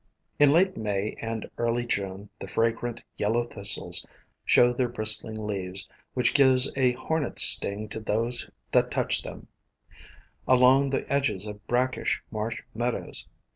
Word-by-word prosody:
In 145 -1 +5
late 185 +5 +2
May 105 -1 -3
and 115 -1 -5
early 120 +1 -1
June 100 -2 -4
the - - -8
fragrant 115 +1 -2
Yellow 115 +3 0
Thistles 100 -4 +2 0.4
show 120 0 +3
their 125 0 -1
bristling 110 -1 +3
leaves, 95 -2 -3 0.3
which 125 -1 +1
give 130 -2 +4 0.2
a 130 -2 +2
hornet's 145 +3 +1
sting 105 +2 +4
to 110 - -5
those 115 +3 -1 0.2
that - - +2
touch - - 0
them, - - -10 1.0
along 130 +2 +4
the 135 - -3
edges 135 -8 -1
of 105 0 -10
brackish 125 +1 -1
marsh 110 +1 -5
meadows. 120 +2 -4
115 Hz, 135 wpm, -26 LUFS, 105-130 Hz, 1.0 s, In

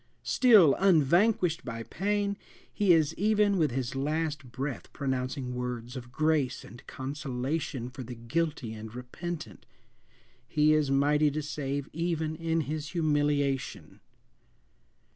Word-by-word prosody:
Still 210 - +6
unvanquished 175 0 +3
by 115 -2 -5
pain, 200 - -1 0.4
he 205 -3 +3
is 160 -2 +4
even 210 -1 +3
with 155 -2 +3
his 125 0 -3
last 145 -1 -2
breath 135 +1 -5
pronouncing 130 -2 -2
words 125 0 -4
of 120 -2 -8
grace 155 -3 0
and 120 - -13
consolation 135 -1 -3
for 130 +2 -8
the 125 0 -7
guilty 125 0 -2
and 110 +1 -9
repentant! 155 +7 -7 0.8
He 150 +4 +3
is 155 -2 +2
mighty 145 +2 +3
to 150 +1 -3
save 140 -1 -3
even 160 -1 -1
in 165 0 0
his 150 +1 -4
humiliation! 145 -5 0
145 Hz, 125 wpm, -29 LUFS, 130-165 Hz, 0.8 s, Still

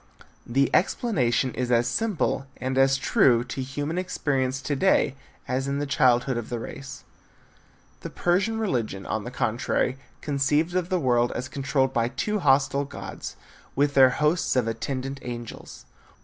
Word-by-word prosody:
The 135 +3 +2
explanation 130 - +1
is 125 -1 -2
as 120 0 +3
simple 160 - -1
and 130 +1 -3
as 135 0 +4
true 120 -3 +3
to 125 +2 -5
human 145 +6 -3
experience 135 -7 -1
to 145 - -1
day 150 -3 +3 0.3
as 130 +2 -1
in 140 0 -1
the 145 - -1
childhood 130 -2 +2
of 120 - -5
the 120 - -2
race. 130 +3 -8 1.0
The - - -7
Persian 195 +6 +1
religion, 120 - -2
on 110 -1 -3
the - - -4
contrary, 125 +2 -1 0.2
conceived 145 +4 +1
of 180 -1 -1
the 185 -2 +1
world 120 -4 +2
as 125 - -4
controlled 135 -1 0
by 115 -1 +1
two 210 - -2
hostile 140 -2 +3
gods, 140 - -8 0.4
with 140 +1 +2
their 130 -2 +7
hosts 150 +5 +1
of 125 -3 +2
attendant 130 +4 -3
angels. 120 -2 -8
135 Hz, 155 wpm, -25 LUFS, 125-145 Hz, 1.0 s, their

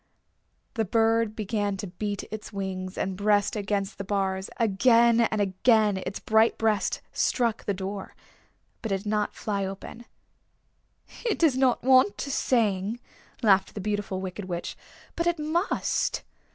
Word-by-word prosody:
The 225 - 0
bird 225 +1 +2
began 205 -1 -1
to 190 - -5
beat 200 +2 -4
its 215 0 -7
wings 190 -2 -4
and 190 0 -2
breast 205 +1 +2
against 200 -1 -2
the - - -2
bars. 190 -1 -1
Again 230 +2 +4
and 220 -2 +1
again 205 +1 +3
its - - -5
bright 220 +1 +3
breast 215 -3 0
struck 235 -3 0
the 200 - 0
door. 195 +1 -6 0.7
But 225 - -4
it 195 0 -1
did - - -24
not 210 0 -1
fly 200 -2 -2
open. 195 +5 -7 1.2
"It 460 -4 0
does 315 -6 +3
not 260 -2 +2
want 260 +9 +5
to 280 - -4
sing," 220 -4 +1 0.4
laughed 195 -3 +3
the - - -4
Beautiful 205 -1 -2
Wicked 190 +1 -5
Witch; 175 -2 -4 0.4
"but 335 - 0
it 345 -1 +2
must. 315 +5 -1
210 Hz, 150 wpm, -27 LUFS, 195-230 Hz, 1.2 s, want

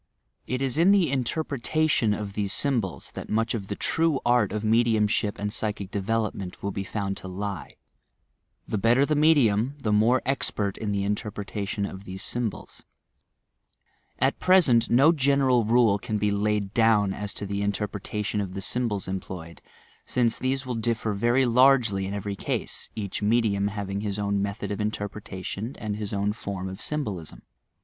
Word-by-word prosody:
It 130 +2 -1
is 135 +3 +1
in 180 +4 +6
the 185 -8 +4
interpretation 140 -1 0
of 105 -1 -3
these 100 -1 -1
sj 135 +1 +3
mbols 95 -4 -7
that - - -8
much 115 +1 +1
of 105 -5 -4
the 100 - -3
true 160 +2 +1
art 120 -4 +3
of 105 0 -3
mediumship 110 -2 +2
and 105 0 -3
psychic 105 -3 -3
development 100 -2 -2
will 100 - -1
be 100 - -3
found 100 -1 -3
to - - -7
lie 95 -2 -5 0.5
— - - -48
the 105 - -1
better 120 +6 +4
the 155 - 0
medium 140 -5 +3
the 115 -7 -2
more 115 +5 +3
expert 105 -7 -1
in 105 -2 -3
the 100 -1 0
interpretation 105 0 -3
of 95 0 -8
these 95 +1 -3
sjTnbols, 120 -2 -4 1.4
At - - +1
present 145 -12 +4
no 135 +7 +6
general 135 -5 +3
rule 115 -3 +4
can 105 +2 -2
be 105 0 +1
laid 105 -1 0
down 110 -4 +3
aa 105 +1 -5
to 100 - -5
the 100 0 -3
interpretation 105 0 -2
of 95 -1 -5
the 100 - -4
symbols 110 -2 -2
employed, 90 -3 -6 0.5
since 120 -2 +1
these 130 +1 -1
will 125 - -3
differ 115 -1 -1
very 120 +6 +2
largely 120 -6 +4
in 100 - -4
every 100 0 -3
ease, - - -2
each 100 -2 -4
medium 105 -2 +2
hav 100 -1 -4
ing 100 +1 -2
his 105 -1 -3
own 100 -1 0
method 100 0 -3
of 105 - -3
interpretation, 105 +1 -4
and 105 -2 -3
his 105 -2 -4
own 100 +1 0
form 100 -3 -5
of 95 0 -7
symbolism. 105 - -4
105 Hz, 170 wpm, -26 LUFS, 100-120 Hz, 1.4 s, in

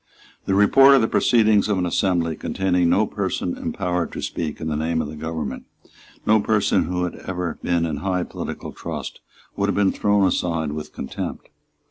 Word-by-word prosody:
The 95 - +1
report 135 +7 +7
of 135 - +4
the 110 - +2
proceedings 110 -4 +3
of 100 - +1
an 90 - 0
assembly 85 -2 0
containing 90 -1 0
no 95 +5 +3
person 95 -3 -2
empowered 90 -2 -2
to - - -5
speak 80 -3 -4
in 80 - -4
the 80 - -1
name 80 +2 -1
of 80 - -2
the 75 - -8
government, 80 -3 -5 0.6
no 110 0 +5
person 105 -1 +2
who 90 +2 -2
had 90 - -3
ever 90 -2 -3
been 85 -1 +1
in 80 -3 -3
high 90 +3 -1
political - - -6
trust, - - -6 0.4
would 100 - 0
have - - 0
been 100 -2 +3
thrown 105 -1 +2
aside 85 -4 0
with 75 0 -6
contempt. 65 - -6
90 Hz, 185 wpm, -22 LUFS, 80-100 Hz, 0.6 s, report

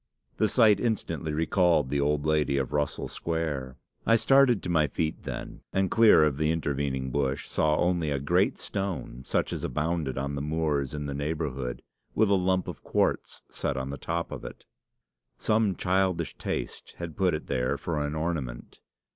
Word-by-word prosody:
The 110 - +2
sight 110 -5 +5
instantly 85 -9 -1
recalled 80 -2 +2
the 70 0 +1
old 75 +1 +1
lady 75 -3 +2
of 65 -2 -2
Russell 75 -1 -1
Square. 75 -6 -3 0.3
I 115 - +4
started 135 -1 +4
to - - -4
my 80 -3 +3
feet, 80 +3 -2
and - - -6
then, 95 -1 +2
clear 115 -7 +6
of 75 -3 +1
the 75 0 +1
intervening 70 -4 -1
bush, 70 0 -1
saw 75 0 +1
only 85 -3 +1
a 70 - 0
great 90 +8 +2
stone 95 -11 -4
such - - 0
as - - -4
abounded 75 -1 -1
on 70 +1 -2
the 70 - -3
moors 75 -2 -1
in 75 -1 -4
the 70 - -3
neighbourhood, 70 -4 -3 0.3
with 110 -2 +3
a - - +6
lump 95 -1 +1
of - - -7
quartz - - 0
set - - -2
on 65 +1 -3
the 70 - -5
top 85 +4 -3
of - - -6
it. - - -9 0.7
Some 110 -3 +2
childish 95 -1 0
taste - - -5
had 85 -2 -6
put 95 -4 +2
it 75 - -6
there 65 0 0
for 80 -3 -2
an 75 +1 -3
ornament. 75 -7 -4
80 Hz, 180 wpm, -28 LUFS, 70-90 Hz, 0.7 s, clear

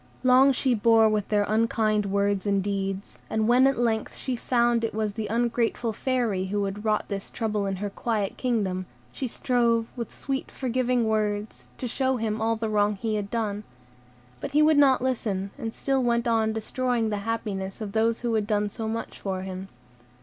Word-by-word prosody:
Long 260 +2 +6
she 260 -1 +1
bore 225 0 +5
with 215 -2 0
their 210 -1 +3
unkind 215 -1 +1
words 200 0 0
and 200 -1 +2
deeds; 195 0 -3
and 220 0 0
when 250 +3 +6
at 270 - +1
length 225 -2 0
she 260 - -3
found 240 -1 +2
it 225 - -2
was 215 -2 -1
the 215 0 -3
ungrateful 235 0 0
Fairy 230 -6 0
who 205 +2 -1
had 200 +1 -4
wrought 215 -1 +1
this 200 -1 -4
trouble 210 -3 -1
in 195 - -1
her 205 +2 -3
quiet 210 -2 -2
kingdom, 195 -7 -1 0.2
she 265 - -3
strove, 235 -2 +1
with 235 -4 -5
sweet, 270 -1 -4
forgiving 250 -2 0
words, 210 -1 -1
to 250 - -3
show 260 +2 0
him 220 -1 -2
all 225 +1 +2
the 225 0 -3
wrong 210 -1 +2
he 220 +2 -2
had 205 -1 -2
done; 210 -2 -2 0.8
but 275 - -6
he 300 +1 +5
would 305 -1 +5
not 265 -3 +5
listen, 205 -7 -1
and 225 -1 -4
still 270 +3 0
went 235 -1 +1
on 225 -1 +2
destroying 230 +1 -1
the 210 - -1
happiness 200 -3 -3
of 215 -3 -5
those 225 +2 +1
who 240 -1 -1
had 215 -2 0
done 210 -1 0
so 225 0 -4
much 225 +1 -4
for 190 -2 -3
him. 190 0 -6
220 Hz, 195 wpm, -26 LUFS, 205-240 Hz, 0.8 s, Long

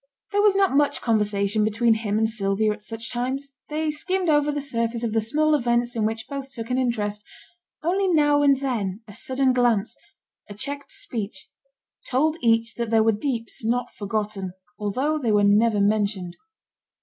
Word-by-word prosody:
There 410 - +2
was 415 -2 +4
not 390 -7 +3
much 290 0 +3
conversation 210 -2 +1
between 225 +2 +3
him 215 -2 -1
and 220 0 +3
Sylvia 215 -1 0
at 210 - -12
such 225 +2 -6
times. 265 +3 -3 0.2
They 305 +1 -1
skimmed 365 +4 -1
over 295 -1 +3
the 290 - -2
surface 235 -4 -2
of 225 -2 -1
the 225 - +2
small 305 +7 +2
events 240 -2 +1
in 220 -2 +1
which 225 +1 -4
both 275 -1 -6
took 230 -1 -6
an 255 - +1
interest; 210 -4 -1 0.6
only 380 +4 +1
now 295 -4 +4
and 280 -2 +4
then 225 -6 -2
a 205 - -11
sudden 260 +3 +1
glance, 235 -3 +1 0.5
a 205 - -8
checked 280 +6 -6
speech, 205 -4 -6 0.6
told 305 +5 +2
each 230 -1 +2
that 235 -2 -2
there 225 -1 +4
were 225 - +4
deeps 230 0 -3
not 245 +2 -1
forgotten, 205 -2 -3 0.3
although 260 +10 0
they 235 -6 0
were 205 -1 +4
never 210 +1 +4
mentioned. 200 -3 0
230 Hz, 175 wpm, -24 LUFS, 210-280 Hz, 0.6 s, was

